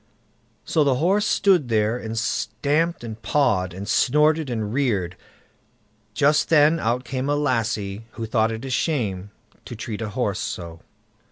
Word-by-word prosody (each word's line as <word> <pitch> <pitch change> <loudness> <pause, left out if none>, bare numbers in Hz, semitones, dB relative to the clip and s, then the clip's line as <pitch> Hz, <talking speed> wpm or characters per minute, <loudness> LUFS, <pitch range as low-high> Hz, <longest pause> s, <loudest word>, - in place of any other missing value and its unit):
So 155 - +2
the 140 -3 +2
horse 195 - +2
stood 180 -10 +3
there 110 0 +1
and 115 -2 -5
stamped 140 +9 -1
and 110 -1 -7
pawed, 95 -11 +1
and 95 +3 -7
snorted 150 +5 +2
and 110 -3 -3
reared. 105 -10 0 1.0
Just 145 +3 +3
then 155 +1 +5
out 120 +1 0
came 130 +2 -3
a 145 - +2
lassie, 115 -6 -1
who 115 - -5
thought 110 0 +1
it 110 +3 -6
a 135 - -5
shame 110 - -1 0.3
to 120 - -8
treat 110 -1 -6
a 110 - -3
horse - - -2
so. 85 -2 -5
120 Hz, 155 wpm, -23 LUFS, 110-145 Hz, 1.0 s, then